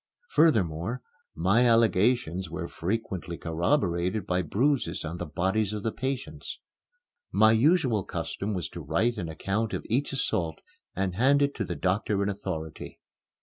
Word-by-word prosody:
Furthermore, 110 - +2 0.3
my 105 +8 +3
allegations 110 -5 +2
were 85 +1 -4
frequently 90 -3 -3
corroborated 90 - 0
by 90 0 +1
bruises 125 - 0
on 80 +3 -4
the 90 - -4
bodies 95 +6 0
of 105 -1 -4
the 115 - 0
patients. 130 +1 -4 0.7
My 110 0 +5
usual 125 - +3
custom 100 +3 -4
was 90 -4 -2
to - - -8
write 120 +1 0
an 85 -5 -3
account 100 +7 -2
of - - -5
each 135 +5 +1
assault 110 -11 -1 0.4
and 95 -2 -1
hand 135 +8 +4
it 140 0 +1
to - - -2
the - - -4
doctor 100 +2 0
in 100 - 0
authority. 90 -6 -5
100 Hz, 150 wpm, -28 LUFS, 90-120 Hz, 0.7 s, My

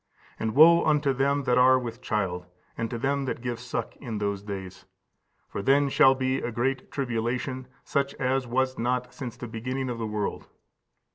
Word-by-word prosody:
And 110 +1 -2
woe 170 +3 +8
unto 150 -3 +2
them 140 +2 +1
that 125 -1 +3
are 130 +1 +6
with 120 -1 -5
child, 95 -7 -2 0.3
and 115 -1 -3
to 120 - -4
them 140 +3 0
that 130 - -3
give 120 -1 -4
suck, 125 0 -4
in 115 -5 -5
those 100 -1 -2
days! 95 -3 -7 0.6
for - - -5
then 140 +5 +3
shall 135 0 +6
be 130 0 0
great 125 +3 -2
tribulation, 125 0 -2 0.2
such 140 0 -1
as 130 0 0
was 130 +2 0
not 125 +1 -1
since 125 -5 -7
the 120 - -6
beginning 125 +3 -3
of 115 - -5
the 110 - -2
world. 105 -1 -3
125 Hz, 180 wpm, -27 LUFS, 115-135 Hz, 0.6 s, woe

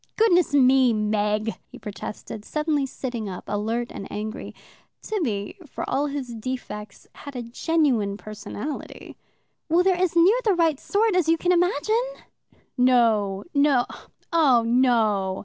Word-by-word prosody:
"Oh, - - -33
goodness 360 -7 +3
me, 260 -2 +5
Meg!" 210 +1 0
he - - -12
protested, 210 +1 -7
suddenly 300 0 -1
sitting 240 -5 -5
up, 185 - -7
alert 225 +4 -2
and 195 - -8
angry. 215 +1 -6 0.4
Tibby, 235 - -3
for - - -6
all 280 +2 0
his 275 -4 -5
defects, 220 -3 -6
had 285 -2 -10
a 245 - -4
genuine 235 -5 0
personality. 215 +6 -7 0.5
"Well, 340 +3 +4
they're 375 0 +3
as 360 -2 0
near 370 +8 +5
the 415 -4 +3
right 325 -5 +2
sort 420 -1 +1
as 350 -3 +2
you 330 - +4
can 355 +2 +1
imagine." 360 +6 +2 0.8
"No, 225 -6 +3
no 280 -4 +3 0.5
oh, 275 -8 +4
no!" 225 -6 +2
255 Hz, 140 wpm, -24 LUFS, 215-325 Hz, 0.8 s, me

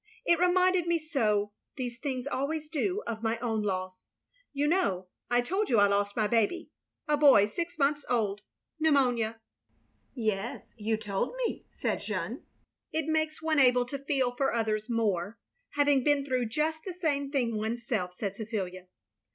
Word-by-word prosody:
It 340 -1 +4
reminded 360 0 +3
me 340 0 +3
so 220 -10 0
— - - -51
^these 245 -2 -4
things 260 -3 -3
always 295 +3 -2
do 365 +7 -1
— - - -25
of 220 -2 -4
my 225 0 0
own 225 -2 -1
loss. 185 -2 -3 0.4
You 285 +1 0
know, 195 - +1 0.2
I 245 0 +3
told 385 - -1
you 235 - +4
I 205 - +7
lost 200 0 +1
my 215 - +2
baby 230 +9 +1 0.2
— - - -59
sl 295 0 +3
boy 275 -9 +7
six 335 +10 -4
months 290 0 +2
old 210 -4 0 0.2
— - - -30
pnetimonia." 245 -7 +2 0.5
" - - -42
Yes, 220 0 -3
you 220 0 -1
told 210 - -2
me, - - -3
" - - -41
said - - +1
Jeanne. - - -4 0.5
"It 320 -1 -1
makes 315 0 -1
one 315 -2 +2
able 250 -2 +5
to 275 +3 -5
feel 270 -3 0
for 270 +1 +1
others 215 -2 -1
more, 215 -3 0 0.4
having 285 -2 +4
been 290 -1 +2
through 255 -3 0
just 310 +7 -1
the 370 -3 -6
same 290 -6 0
thing 245 -5 0
oneself, 220 -4 -2
" - - -32
said 200 -2 -3
Cecilia. 190 -4 -4
245 Hz, 185 wpm, -29 LUFS, 215-300 Hz, 0.5 s, I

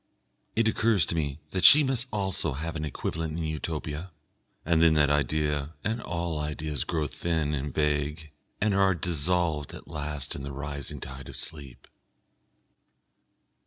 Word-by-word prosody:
It 115 0 +3
occurs 110 -5 +3
to - - -2
me 75 -2 -2
that 95 - -1
she 150 -1 +9 0.2
also 95 -3 -1
must 70 - -5
have 80 0 -3
an 75 -1 -2
equivalent 80 +2 -3
in 85 - -2
Utopia, 80 +2 -3 0.5
and 80 0 +3
then 80 -1 +6
that 75 -1 +4
idea 75 +1 0
and 115 +2 -1
all 85 -2 -2
ideas 75 -1 -2
grow 80 -3 0
thin 80 0 -1
and 70 0 -2
vague, 75 +1 0 0.3
and 105 -1 +2
are 95 -1 +4
dissolved 85 -2 0
at - - -11
last 75 -3 -4
in 70 - -5
the 70 0 -5
rising 70 0 -5
tide 65 +1 -7
of - - -8
sleep.... 70 -6 -7
75 Hz, 155 wpm, -28 LUFS, 75-85 Hz, 0.5 s, she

